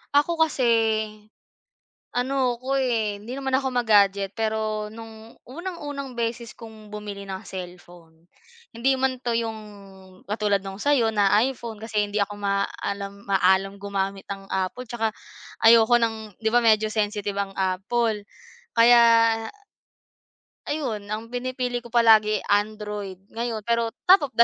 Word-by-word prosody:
Ako 325 +3 +3
kasi 310 -5 +2 1.5
ano 255 -1 0
ako, 265 +2 -1
eh. 220 -5 0
Hindi 230 +4 -7
naman 270 -1 -3
ako 265 0 0
ma-gadget. 200 -5 +3
Pero 215 -1 -2
nung 225 0 -12
unang-unang 290 -4 -6
beses 235 0 -3
kong 220 -2 -12
bumili 210 -1 -7
ng 190 +2 -5
cellphone, 175 -3 -11 0.5
hindi 265 +4 +2
man 260 -1 0
'to 235 -1 0
'yong 225 -1 -3 0.7
katulad 205 -2 0
nung 195 0 -7
sa'yo 260 -6 +3
na 205 -2 +3 0.2
iPhone. 235 -4 -5
Kasi 215 -2 -1
hindi 205 - -3
ako 205 +1 -8
maalam 200 0 -3
maalam 190 0 +3
gumamit 195 -1 -3
ng 195 0 -13
Apple 190 +7 -3
tsaka 225 -2 -1 0.5
ayoko 230 +1 +7
ng 220 -2 -2
di 220 - +1
ba, 240 - +5
medyo 215 -1 +4
sensitive 205 -2 -1
ang 200 -1 -2
Apple 205 +4 0 0.5
kaya 230 -1 +5 1.2
ayun 250 -9 -3
ang 220 +2 -4
pinipili 250 0 -3
ko 235 - -12
palagi 220 -3 +5
Android 205 -2 -1
ngayon 230 -1 -3
pero 230 +1 0 0.2
top 330 -8 +6
of - - -52
the 235 - +7
220 Hz, 135 wpm, -24 LUFS, 205-240 Hz, 1.5 s, ayoko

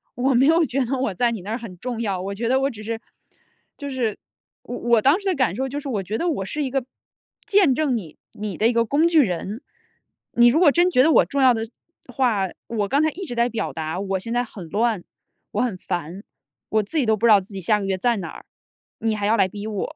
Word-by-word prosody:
我 260 +2 +1
没 260 - +5
有 325 +3 +5
觉 275 -1 0
得 270 - -1
我 255 -6 -1
在 235 +5 +1
你 220 -5 -4
那 200 - -8
儿 225 - -1
很 225 -7 -9
重 240 -2 -4
要， 195 -5 -2
我 200 +1 -4
觉 230 +3 -2
得 260 +2 +3
我 275 - +2
只 215 -5 -9
是 225 +1 -3 0.8
就 285 -1 -6
是 245 -6 -2 0.5
我 245 - -6
我 235 -2 +3
当 280 - +4
时 405 - -13
的 380 - +2
感 250 -9 +1
受 265 +2 -2
就 285 +2 -4
是 285 - -6
我 210 -6 -2
觉 210 +4 -3
得 350 - -1
我 195 -11 -2
是 295 +10 -3
一 270 - -2
个 265 -1 -1 0.6
见 395 -9 +4
证 270 -3 +1
你 165 -8 -9 0.2
你 210 -2 -5
的 220 - +3
一 240 - +2
个 230 0 +2
工 295 +8 +3
具 330 -2 +5
人。 205 - -2 0.8
你 240 - +7
如 300 - +3
果 345 -4 +7
真 345 +5 +3
觉 255 - +5
得 295 - +5
我 - - +6
重 280 -1 -1
要 255 -1 +6
的 225 -1 -2 0.5
话， 220 -8 +1 0.2
我 210 -3 -1
刚 280 +3 +3
才 315 - +3
一 380 +5 -7
直 245 - -6
在 235 0 +2
表 225 -2 -3
达， 160 +1 -4
我 195 -1 -2
现 230 +5 -5
在 245 +1 +1
很 195 -7 -10
乱、 220 -1 0 0.5
我 - - -1
很 235 -7 -1
烦， 180 +2 -5 0.5
我 215 0 +2
自 260 +11 -5
己 275 - +2
都 220 - +3
不 215 - -1
知 235 - +6
道 205 - +8
自 195 +2 -11
己 195 - -5
下 210 +4 +2
个 195 - -4
月 190 -1 -1
在 235 +3 +1
哪 170 -4 -5
儿， - - -12 0.5
你 225 -1 0
还 205 -1 -2
要 220 +2 +3
来 190 - +4
逼 205 +2 -8
我。 220 +8 -4
230 Hz, 285 characters per minute, -23 LUFS, 200-270 Hz, 0.8 s, 道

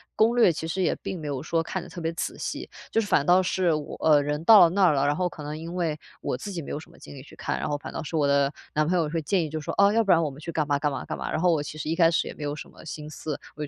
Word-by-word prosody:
攻 230 +3 +3
略 205 -8 +6
其 160 +1 -5
实 190 +3 -1
也 - - +1
并 185 - -5
没 155 - -6
有 140 -3 -3
说 165 +1 0
看 175 +2 -4
得 - - -11
特 175 - -8
别 165 0 -2
仔 165 - -4
细， - - -5 0.2
就 225 - +2
是 210 - -4
反 145 - +2
倒 180 +3 +5
是 180 -2 +1
我 150 -1 -4
呃， 150 -2 +4
人 150 +1 -2
到 220 0 +9
了 170 - +7
那 195 +3 +1
儿 170 - +5
了， 140 -1 +1
然 145 - +3
后 180 - +1
可 155 -3 -9
能 150 +1 -5
因 165 +2 -7
为 165 -4 -1 0.2
我 125 - -2
自 205 - -7
己 180 -4 -4
没 - - -8
有 - - -3
什 155 - -14
么 - - -18
精 - - -12
力 135 - -9
去 140 - -15
看， - - -3
然 - - -2
后 145 -1 -1
反 - - -8
倒 - - -4
是 155 +2 -5
我 150 -2 +2
的 140 0 +2 0.2
男 155 0 +2
朋 180 - +1
友 160 -3 +1
会 165 +1 -2
建 180 +3 +1
议 155 - -4
就 155 +1 -4
说， 150 - -5
哦， 200 0 +6
要 225 +2 +3
不 200 -4 +2
然 165 -1 +5
我 155 - 0
们 140 +1 -11
去 160 - -8
干 160 -2 0
嘛 145 -1 0
干 150 0 +1
嘛 140 - -4
干 - - -5
嘛。 - - -4
然 155 - -1
后 180 0 +4
我 160 -3 +1
其 150 +1 -7
实 155 0 -4
一 165 - 0
开 165 -1 +5
始 165 - 0
也 - - -7
没 150 - -8
有 145 0 -2
什 150 - -9
么 - - -15
心 150 -1 -7
思， 155 0 -5 0.2
我 150 - -4
就 - - -9
160 Hz, 395 characters per minute, -26 LUFS, 150-175 Hz, 0.2 s, 到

